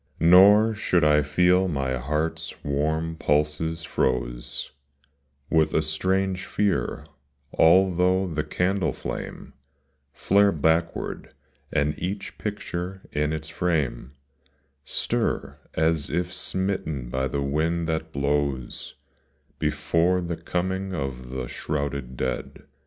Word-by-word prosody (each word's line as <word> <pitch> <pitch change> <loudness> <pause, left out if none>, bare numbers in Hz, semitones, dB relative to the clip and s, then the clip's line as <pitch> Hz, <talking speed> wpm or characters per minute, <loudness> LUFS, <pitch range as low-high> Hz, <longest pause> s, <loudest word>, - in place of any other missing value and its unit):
Nor 100 +6 +7
should 90 -5 +1
I 75 0 +5
feel 90 +6 +3
my 70 -6 -1
heart's 75 +4 -2
Avarm 80 +3 -1
pulses 75 +3 0
froze - - -2 0.8
With 80 -1 +2
a 80 - +3
strange 95 +4 0
fear, 100 -3 0 0.5
although 90 +2 +4
the 80 -4 -2
candle 90 +4 0
flame - - -6 0.6
Flare 100 +8 +3
backward, 80 +1 -1 0.4
and 75 +1 +1
each 95 +3 -4
picture 95 -2 -4
in 75 +1 0
its 80 -1 -4
frame 75 -9 -1 0.7
Stir, - - -1 0.2
as 80 -2 +1
if 90 +1 -1
smitten 95 -10 -2
by 65 +1 0
the 70 +1 -2
wind 80 +4 0
that 80 -1 -2
blows 70 -3 -2 0.6
Before 90 +2 +1
the 85 -1 -3
coming 95 +3 -2
of 65 -4 -4
the 65 -1 -4
shrouded 70 -4 -4
dead. - - -3
80 Hz, 110 wpm, -25 LUFS, 75-90 Hz, 0.8 s, Nor